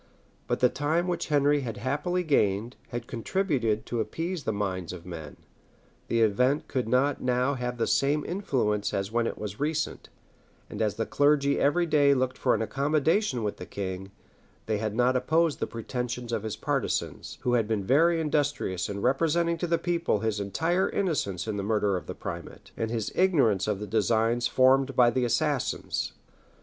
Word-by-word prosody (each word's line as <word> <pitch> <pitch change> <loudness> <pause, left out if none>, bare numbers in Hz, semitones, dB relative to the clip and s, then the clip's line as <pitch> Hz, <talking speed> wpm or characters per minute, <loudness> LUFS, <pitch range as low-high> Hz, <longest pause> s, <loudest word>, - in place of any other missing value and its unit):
But - - -1
the 125 - +7
time 150 +7 0
which 180 - -2
Henry 145 -1 +3
had 115 -5 -5
happily 150 - -1
gained, 115 - +1
had 120 -1 -5
contributed 120 - -1
to 120 - -3
appease 165 +7 -3
the - - +1
minds 95 -4 -3
of 85 -2 -10
men; 80 -4 -8 0.7
the 115 - +1
event 125 +7 +2
could 130 -4 -2
not 130 +3 +2
now 125 +2 +1
have 125 -2 -3
the 115 - +1
same 145 +2 +1
influence 125 - -1
as 100 +1 -2
when 115 0 +1
it - - -4
was 105 -1 -6
recent; 155 +2 -2 0.6
and 105 - -5
as 105 -2 +1
the 115 +1 -1
clergy 145 -1 +2
every 160 +5 +3
day 145 -3 +4
looked 130 0 0
for - - +3
an 110 - -1
accommodation 140 - +1
with 105 - -2
the - - -7
king, 95 -1 -5 0.6
they 110 -2 -1
had 110 -1 -2
not 125 +2 +3
opposed 160 +5 +2
the - - -1
pretensions 120 +1 -4
of 115 -2 -1
his 110 -1 -4
partisans, - - -2
who 125 - 0
had 115 -3 +2
been 110 -3 -1
very 165 - +4
industrious 145 - -1
in 100 0 -4
representing 165 +6 +2
to 175 - -1
the 170 0 +2
people 170 - 0
his 110 -2 -1
entire 165 - 0
innocence 135 - -1
in 105 -2 -2
the 100 - -2
murder 105 -1 +1
of 90 - -5
the - - -5
primate, - - -8
and 115 - -2
his 110 -2 -2
ignorance 135 - +3
of 105 -2 -1
the 105 - -4
designs 115 +3 +1
formed 135 +1 +3
by 120 -1 +5
the 130 -1 +1
assassins. 120 - -1
125 Hz, 185 wpm, -27 LUFS, 105-145 Hz, 0.7 s, the